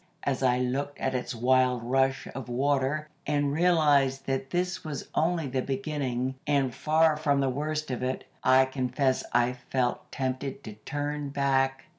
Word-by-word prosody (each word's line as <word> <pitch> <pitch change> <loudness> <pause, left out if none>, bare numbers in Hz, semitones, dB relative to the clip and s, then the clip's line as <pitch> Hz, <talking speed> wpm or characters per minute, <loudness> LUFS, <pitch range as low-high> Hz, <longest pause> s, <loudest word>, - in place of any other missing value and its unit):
As 135 -2 -1
I 125 -1 +3
looked 135 +3 -2
at 130 - -1
its 125 -1 -3
wild 125 0 +2
rush 135 +2 +1
of 135 -2 -7
water, 140 +3 0 0.2
and 145 -1 +1
realized 145 -5 +3
that 135 0 -2
this 180 +1 -1
was 150 -3 -5
only 165 -1 +1
the 130 -1 -1
beginning, 135 -2 -2
and 140 -4 +2
far 155 +2 +3
from 145 -2 +1
the 135 -1 +2
worst 150 +2 -2
of 125 - -3
it, 130 +1 -2 0.2
I 130 +1 +6
confess 130 0 0
I 120 +1 +2 0.2
felt 125 -2 -1
tempted 130 +1 -3
to 110 - -7
turn 145 +6 -4
back. 135 -1 +1
135 Hz, 160 wpm, -28 LUFS, 130-145 Hz, 0.2 s, I